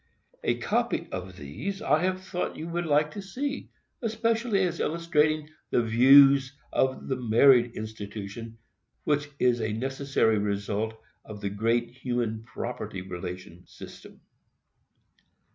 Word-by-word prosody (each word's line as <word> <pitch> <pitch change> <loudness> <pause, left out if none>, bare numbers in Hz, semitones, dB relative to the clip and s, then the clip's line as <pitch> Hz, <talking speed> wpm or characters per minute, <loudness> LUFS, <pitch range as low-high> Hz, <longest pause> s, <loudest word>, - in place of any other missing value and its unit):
A - - +1
copy - - -1
of 90 0 -6
these 135 - -5
I 150 +3 +2
have 185 +1 -1
thought 180 -1 -3
you 160 - -5
would 170 0 -2
like 150 0 +3
to 205 - -6
see, 275 +9 -4 0.3
especially 225 -2 +1
as 175 -2 -1
illustrating 155 -2 +1 0.2
the 120 - +2
views 135 +4 +6 0.2
of 130 0 0
the 130 - 0
marriage 120 0 +5
institution 110 +1 -7 0.5
which 145 -1 0
is 125 -3 +2
a 110 -1 -1
necessary 135 -2 +1
result 105 +2 -2 0.3
of 105 -1 -9
the 100 -1 -3
great 115 +3 0
human 120 -3 -2
property 100 -4 -6
relation 90 -1 -7
system. - - -13
125 Hz, 125 wpm, -27 LUFS, 110-155 Hz, 0.5 s, views